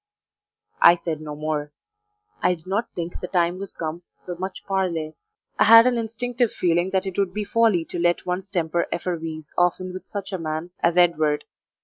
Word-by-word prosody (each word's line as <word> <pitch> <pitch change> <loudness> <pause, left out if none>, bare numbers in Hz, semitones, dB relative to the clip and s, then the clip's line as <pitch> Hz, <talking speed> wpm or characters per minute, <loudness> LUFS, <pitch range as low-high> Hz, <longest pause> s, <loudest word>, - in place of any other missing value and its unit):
I 170 - +9
said 165 -3 -4
no 150 -1 -6
more. 150 -1 -3 0.7
I 180 - +3
did 160 - -20
not 205 +5 -2
think 170 0 -5
the 180 - -5
time 175 0 +1
was 200 -1 -7
come 160 +1 -4 0.2
for 180 - -5
much 185 +2 -6
parley. 175 -5 -1 0.5
I - - +6
had 230 +1 +9
an 250 -1 +3
instinctive 235 +1 -1
feeling 175 +1 +1
that 190 0 0
it 190 0 -3
would 190 -1 0
be 210 - -1
folly 210 -6 +2
to 175 - -5
let 175 0 +1
one's 185 +2 -3
temper 170 -3 0
effervesce 165 -3 -4
often 180 +1 +1
with 185 - -8
such 200 -1 -6
a 190 - -2
man 160 +2 -4
as 170 +1 +1
Edward. 155 -4 +3
175 Hz, 190 wpm, -23 LUFS, 165-195 Hz, 0.7 s, I